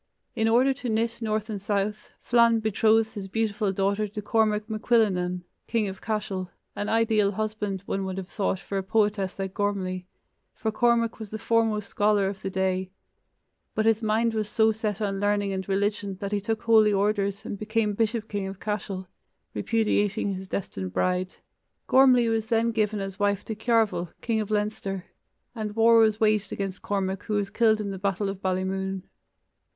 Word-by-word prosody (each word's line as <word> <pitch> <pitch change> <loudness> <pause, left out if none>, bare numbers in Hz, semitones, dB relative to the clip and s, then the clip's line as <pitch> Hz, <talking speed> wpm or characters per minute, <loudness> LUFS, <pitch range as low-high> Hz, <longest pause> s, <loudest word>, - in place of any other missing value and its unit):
In 225 -1 +1
order 250 +4 +4
to 260 -2 -5
knit 225 +1 0
north 215 -1 -1
and 210 -3 -5
south, 205 +1 -2
Flann 235 -1 +4
betrothed 220 +1 +2
his 200 -3 -6
beautiful 210 0 0
daughter 200 +2 0
to 210 +1 -7
Cormac 215 0 +1
macCuillenan, 205 -6 +1 0.2
king 225 -3 +1
of 190 0 -7
Cashel, 205 -4 -3 0.3
an 205 - -3
ideal 220 -3 +2
husband, 210 -2 -3
one 195 -1 -2
would 190 0 -4
have 190 -2 -5
thought, 190 -1 -1
for 195 0 -3
a - - -1
poetess 205 -1 0
like 190 -1 -4
Gormlai, 190 -3 -2 0.5
for 220 - -2
Cormac 230 0 +2
was 220 -2 -7
the 220 - -5
foremost 225 -2 +1
scholar 205 -1 +2
of 195 0 -5
the 195 - -3
day; 190 -1 -1 0.9
but 215 - +1
his 225 0 +3
mind 225 +1 +1
was 215 -1 -1
so 220 -1 +3
set 215 -1 -3
on 195 -2 -1
learning 205 -1 +1
and 190 0 -4
religion 200 0 0
that 200 0 -4
he 205 -1 0
took 220 +2 -2
holy 220 -2 +5
orders 200 0 0
and 205 - -5
became 215 0 0
bishop 220 +1 -1
king 200 -3 -3
of 195 0 -7
Cashel, 200 -3 -4 0.5
repudiating 210 -2 +1
his 190 0 -7
destined 95 - -4
bride. 185 0 0 0.5
Gormlai 255 -3 +6
was 225 -1 0
then 230 0 +2
given 215 -2 0
as 195 0 -6
wife 205 -1 +1
to 220 - -3
Cearbhail, 220 -6 +1
king 225 -2 0
of 210 - -5
Leinster, 210 -3 -2 0.5
and 215 -3 -4
war 230 0 +6
was 215 -1 +4
waged 215 -1 +2
against 195 -2 -4
Cormac 195 -1 -2
who 215 - -1
was 200 -1 -1
killed 220 -2 +3
in 205 -2 -3
the 190 - -6
battle 195 +1 -1
of 195 0 -6
Ballymoon. 190 0 -2
210 Hz, 180 wpm, -26 LUFS, 195-220 Hz, 0.9 s, Gormlai